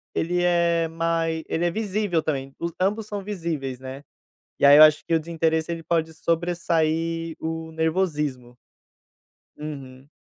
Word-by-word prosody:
ele 175 +2 0
é 170 -1 +2
mai 165 0 -1
ele 170 +2 0
é 170 - +1
visível 205 -5 -1
também, 135 -3 -3
os 170 0 -3
ambos 205 +3 0
são 205 -2 -5
visíveis, 165 -10 -4
né, 130 +2 -8 0.5
e - - +3
aí 145 +1 +9
eu 155 - +11
acho 155 0 +5
que 165 - -1
o 165 - +4
desinteresse, 160 0 -1
ele 165 -1 -5
pode 160 -1 0
sobressair 165 -1 -1
o 160 0 -5
nervosismo. 150 -7 -1 1.0
Uhum. 140 -3 -8
165 Hz, 145 wpm, -24 LUFS, 155-170 Hz, 1.0 s, eu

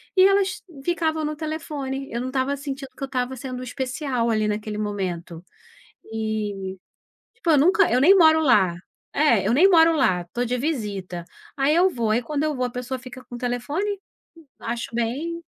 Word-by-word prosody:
e 375 - +6
elas 395 -1 +1 0.2
ficavam 320 -2 0
no 305 0 -2
telefone, 290 -3 -4
eu 235 - -2
não 255 - -3
estava 265 +1 0
sentindo 275 -1 -6
que - - -7
eu - - +1
estava 255 0 -2
sendo 255 0 -6
especial 255 -1 -2
ali 215 -1 +1
naquele 210 0 -3
momento 180 -5 -4 0.7
e 210 -3 -3 0.6
tipo 410 -7 -1
eu 300 - +6
nunca 365 - +4
eu 250 - +3
nem 375 +8 +7
moro 320 -2 +6
lá. 200 - +4 0.4
É, 235 - +3
eu 225 - +2
nem 350 +10 +6
moro 330 -2 +6
lá, 185 - +2
estou 205 +8 -4
de 250 +2 -1
visita. 205 - -3 0.3
Aí 280 +3 +2
eu 365 +2 +4
vou, 235 -7 -2
aí 235 +3 +2
quando 300 +3 -2
eu 305 -1 0
vou 250 - 0
a 245 - -2
pessoa 250 +1 -4
fica 255 +1 -10
com 245 - -11
o - - -5
telefone. 295 - -2 0.6
Acho 235 0 -4
bem 290 +9 -2
260 Hz, 185 wpm, -24 LUFS, 225-310 Hz, 0.7 s, nem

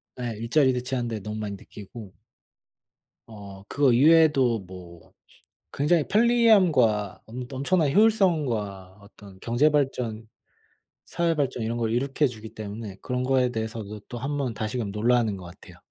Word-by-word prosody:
네 120 -3 -4
일자리 130 +5 +2
대체하는데 125 -3 -3
너무 105 +2 -6
많이 105 -2 -4
느끼고 100 0 -12 1.1
어 100 -3 -11
그거 140 -3 +2
이외에도 140 -3 +4
뭐 90 -2 -13 0.6
굉장히 150 +2 +1
편리함과 190 - +3
엄 125 +2 -7
엄청난 140 +3 +1
효율성과 135 - +1
어떤 100 -2 -16
경제 120 +6 +2
발전, 125 -7 -1 0.8
사회 170 -1 0
발전 135 -5 -2
이런 115 +1 -2
걸 115 -1 -1
이룩해 135 +4 +1
주기 110 -2 -10
때문에 105 -1 -7
그런 125 0 -2
거에 130 -1 +2
대해서도 110 -2 -5
또 120 - -6
한번 135 -1 -3
다시금 110 0 -3
놀라는 115 -1 +1
것 95 - -10
같아요. 85 +2 -14
120 Hz, 305 characters per minute, -25 LUFS, 105-140 Hz, 1.1 s, 이외에도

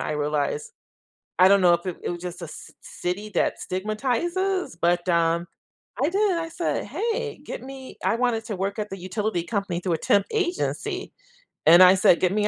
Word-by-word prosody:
I - - -2
realized 150 0 -1 0.7
I 185 - +8
don't 200 0 +5
know 175 -2 +6
if 170 - -3
it 180 -2 -4
it - - -3
was 175 -1 -5
just 180 0 -6
a 170 - -6
c - - -11
city 195 +4 -4
that - - +1
stigmatizes, 275 - -1
but, 175 +1 +1
um 170 0 +2 0.6
I 300 - +3
did, 390 -2 +1
I 330 0 -3
said, 335 +1 -2
"Hey, 460 -1 -3
get - - -6
me" 265 0 -10
I 230 - +2
wanted 235 -2 0
to 210 - -4
work 195 +3 -2
at 210 0 -3
the 195 - -6
utility 185 0 -2
company 200 -3 -2
through 180 -1 -1
a - - +1
temp 200 +5 +2
agency, 375 -5 -2 0.5
and 170 +3 +9
I 185 +1 +8
said, 180 -2 +4
"Get 185 -1 +3
me 210 +1 +1
195 Hz, 195 wpm, -24 LUFS, 175-265 Hz, 0.7 s, and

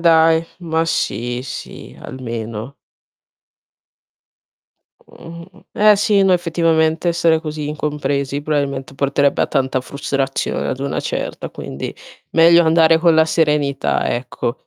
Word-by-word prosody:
dai, 165 -1 +4
ma 165 -2 -1
sì, 120 -5 -2
sì, - - -9
almeno. 115 0 -6 2.2
Mh, 170 0 -12
mh. - - -19
Eh 210 0 +5
sì, 205 -1 +2
no 190 -1 +4
effettivamente 165 -1 +1
essere 165 -1 +2
così 155 -2 -5
incompresi, 145 -2 -2
probabilmente 140 -2 -2
porterebbe 140 +1 +1
a - - +1
tanta 130 -1 0
frustrazione 135 0 -3
ad 130 - -3
una 140 - -2
certa, - - -4
quindi 65 - -7 0.4
meglio 170 +1 +6
andare 160 0 +4
con 165 0 +4
la 160 0 +5
serenità 150 -4 0
ecco, 120 0 -4
150 Hz, 120 wpm, -18 LUFS, 135-165 Hz, 2.2 s, meglio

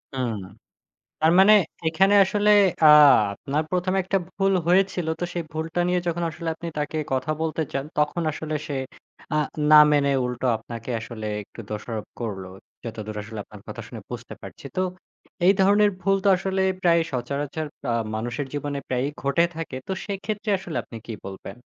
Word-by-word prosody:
হুম, 125 -4 -1 0.9
তার 160 +1 +5
মানে 200 +3 +8 0.3
এখানে 190 +5 +3
আসলে 205 +2 +1 0.3
আ - - +9 0.5
আপনার 145 +8 -2
১ম 180 +1 0
এ - - +3
একটা 195 +2 +1 0.2
ভুল 195 0 +2
হয়েছিল। 180 -1 +2
তো - - -2
সেই 175 - -2
ভুলটা 160 +2 -3
নিয়ে 180 0 +2
যখন 170 0 -1
আসলে 165 +1 -4
আপনি 170 - -7
তাকে 150 +1 -2 0.2
কথা 130 +4 0
বলতে 160 0 -1
চান, 135 0 -2
তখন 150 +3 +1
আসলে 155 0 -4
সে 145 - -3 0.6
আ - - +3 0.3
না 155 - +10
মেনে 140 -1 +3
উল্টো 125 +1 -3
আপনাকে 115 +1 -9
আসলে 110 -1 -7 0.2
একটু 105 - -16
দোষারোপ 110 +1 -5
করল। 105 -5 -4 0.4
যতদূর 110 -2 -6
আসলে 110 +1 -8
আপনার 105 0 -14
কথা - - -7
শুনে - - -9
বুঝতে - - -7
পারছি। - - -11
তো 185 - +1 0.6
এই 190 - +7
ধরনের 205 +2 +5
ভুল 195 +1 +2
তো - - +2
আসলে 190 +1 -1 0.2
প্রায়ই 170 -2 +4
সচরাচর 140 +4 -3 0.3
আ - - +1 0.2
মানুষের 120 +5 -3
জীবনে 145 -1 -3
প্রায়ই 130 +2 0
ঘটে 140 +5 +3
থাকে। 165 -5 -5
তো - - -3
সেক্ষেত্রে 205 +2 -4
আসলে 180 -4 -6
আপনি 115 - -10
কি 115 - -6
বলবেন? 95 +2 -8
155 Hz, 170 wpm, -24 LUFS, 125-180 Hz, 0.9 s, না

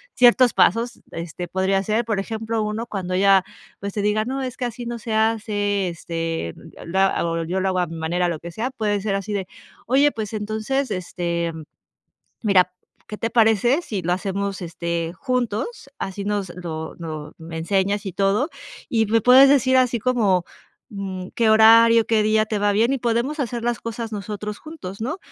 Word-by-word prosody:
ciertos 245 0 +6
pasos. 230 +4 +2
Este 170 +1 -6
podría 190 +2 0
ser, 220 +4 0
por 215 -3 -1
ejemplo, 220 +2 -2
1 215 +2 -3
cuando 190 -4 -4
ya, 195 0 +5 0.4
pues, 200 0 -5
te 210 - -2
diga: 210 +1 +1
"No, 265 +3 -3
es 255 -1 -5
que 255 - -2
así 240 0 -5
no 240 0 -4
se 225 0 -5
hace, 210 -3 +1
este, 165 - -4
yo - - -13
lo 175 +3 -3
hago 170 -3 +1
yo 180 +4 -2
lo 190 - 0
hago 185 - -1
a 180 - +2
mi 165 - -7
manera, 175 +2 0
lo 165 - -3
que 170 - -8
sea", 235 +9 -3
puede 210 -5 -1
ser 200 0 -2
así 195 +1 -3
de: 195 -2 -2 0.4
"Oye, 275 +4 +4
pues, 220 -3 -5
entonces, 220 +6 -2
este, 170 -3 -2 0.9
mira, 185 -4 +4 0.4
¿qué 210 - -7
te 230 - -1
parece 230 - +3
si 210 - -4
lo 175 0 0
hacemos, 195 0 -3
este, 170 0 -3
juntos, 250 - -2
así 195 +1 -4
nos 205 -2 -1
lo 160 -3 -6
no 155 -3 -7
me 165 0 -8
enseñas 195 +4 0
y 190 - -3
todo 200 - +1 0.4
y 225 -2 +2
me 225 +2 +2
puedes 260 +4 +7
decir 260 -2 +4
así 250 -2 +3
como, 210 -7 +2 0.5
mm, 190 -3 -5
qué 230 -2 +3
horario, 230 +1 +7
qué 220 -2 +3
día 215 +1 +2
te 215 -1 -2
va 205 0 +2
bien 230 +6 +2
y 275 - 0
podemos 240 +5 -1
hacer 240 -3 -3
las 240 -2 0
cosas 230 0 -5
nosotros 210 0 -5
juntos", 280 - -9
¿no?, 285 - -3
210 Hz, 190 wpm, -22 LUFS, 185-230 Hz, 0.9 s, puedes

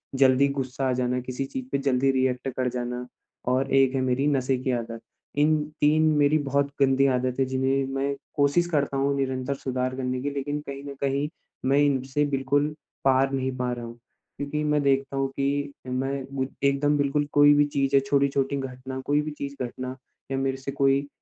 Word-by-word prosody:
जल्दी 135 +1 +5
गुस्सा 135 -1 -2
आ - - +2
जाना 125 0 0
किसी 130 +2 -4
चीज़ 130 -1 -5
पे 140 - +2
जल्दी 135 -1 +2
रिएक्ट 130 -1 0
कर 130 -1 +1
जाना 125 0 -4 0.5
और 135 +2 +1
एक 135 0 +4
है 130 - +1
मेरी 130 +2 +1
नशे 135 -2 +1
की 130 +1 -2
आदत। 115 -1 -3 0.4
इन 150 +2 +4 0.3
तीन 155 +2 +4
मेरी 145 +1 +4
बहुत 140 0 +1
गंदी 135 0 +4
आदत 125 0 0
हैं 135 - +3
जिन्हें 130 +1 +1
मैं 140 +1 0 0.2
कोशिश 145 +5 +3
करता 140 -4 0
हूँ 140 +1 +1
निरंतर 130 0 -1
सुधार 130 -1 -2
करने 130 -1 -2
की 145 - -1
लेकिन 145 +1 -3
कहीं 140 0 -6
न 140 -1 -6
कहीं 140 +1 0 0.4
मैं 135 +2 +3
इनसे 140 0 +1
बिल्कुल 145 +1 +1 0.4
पार 135 0 +4
नहीं 130 -1 -1
पा 125 -1 -1
रहा 120 -1 -4
हूँ। 115 0 -9 0.4
क्योंकि 150 +1 -2
मैं 150 -1 +2
देखता 135 0 +1
हूँ 135 0 +1
कि 140 +1 0
मैं 130 +2 -1 0.2
गु 130 -1 0 0.2
एकदम 145 +1 +2
बिल्कुल 145 +1 +1
कोई 145 0 +7
भी 145 0 +4
चीज़ 140 -1 0
है - - +8
छोटी-छोटी 140 0 +1
घटना 130 0 -6
कोई 145 +1 +2
भी 150 0 -4
चीज़ 140 0 -5
घटना 130 +1 -5 0.4
या 135 - 0
मेरे 135 0 -1
से 135 +1 -5
कोई 140 0 +2
135 Hz, 195 wpm, -26 LUFS, 130-140 Hz, 0.5 s, है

